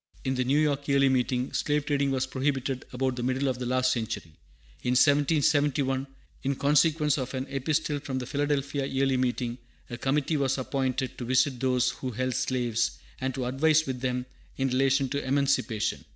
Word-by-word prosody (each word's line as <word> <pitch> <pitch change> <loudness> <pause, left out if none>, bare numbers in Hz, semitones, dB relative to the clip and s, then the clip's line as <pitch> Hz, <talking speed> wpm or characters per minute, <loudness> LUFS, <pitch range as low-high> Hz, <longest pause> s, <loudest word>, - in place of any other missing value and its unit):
In 130 - 0
the 130 -1 0
New 135 +3 +2
York 145 -2 +1
Yearly 140 -1 +4
Meeting, 125 0 0
slave 145 -1 0
trading 140 -2 +1
was 130 -1 0
prohibited 135 -1 -2
about 130 0 -1
the - - -2
middle 130 +3 0
of 130 -2 -1
the 125 - -3
last 130 0 +2
century. 110 -9 -3 0.5
In 125 - 0
1771, 145 -1 +3 0.3
in 140 0 -1
consequence 150 +1 +3
of 130 +1 -4
an 130 0 -2
Epistle 145 +2 -1
from 135 -1 -4
the 125 - -3
Philadelphia 140 0 -1
Yearly 135 -1 +1
Meeting, 125 -1 -1 0.3
a 120 - -5
committee 145 +3 +1
was 135 -1 +1
appointed 130 -1 -2
to 125 - -4
visit 130 +1 +2
those 125 -1 +2
who 130 - -5
held 130 +2 -2
slaves, 120 -3 0 0.2
and 130 -1 -2
to 130 - -2
advise 155 +5 +3
with 130 -2 -4
them 125 -1 -1 0.3
in 135 0 +1
relation 135 +1 +2
to 140 +2 -2
emancipation. 130 -5 0
130 Hz, 180 wpm, -27 LUFS, 125-140 Hz, 0.5 s, Yearly